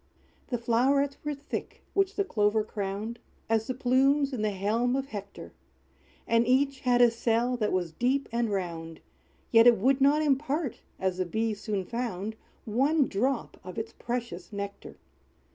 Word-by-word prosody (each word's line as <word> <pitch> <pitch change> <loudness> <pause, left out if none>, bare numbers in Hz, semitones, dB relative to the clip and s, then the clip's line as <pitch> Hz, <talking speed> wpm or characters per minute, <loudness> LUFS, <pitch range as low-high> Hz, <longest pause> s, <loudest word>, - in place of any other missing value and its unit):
The 245 - -1
flow'rets 265 +5 +2
were 295 0 -2
thick 280 +1 -6
which 390 0 +1
the 400 - +1
Clover 215 - +1
crowned, 210 +2 -4 0.3
As 225 0 +1
the 255 - -2
plumes 270 +2 +3
in 240 - -2
the 215 - +1
helm 215 +6 0
of 270 0 -1
Hector; 200 - -8 0.7
And 230 +1 +3
each 270 +1 +2
had 245 -1 +4
a 240 - +6
cell 235 +2 +1
that 215 -3 0
was 180 -3 -1
deep 255 - 0
and 235 -1 0
round, 165 -5 -4 0.5
Yet 230 0 +7
it 240 -2 +7
would 265 +6 +2
not 290 +3 +4
impart, 290 -1 0 0.2
as 185 -1 -1
the 185 - +1
Bee 220 +5 0
soon 205 -2 -3
found, 220 -3 -3 0.3
One 275 +7 +2
drop 250 +5 -1
of 185 -1 -9
its 225 0 -4
precious 235 -7 -5
nectar. 200 -1 -6
235 Hz, 160 wpm, -28 LUFS, 205-270 Hz, 0.7 s, Yet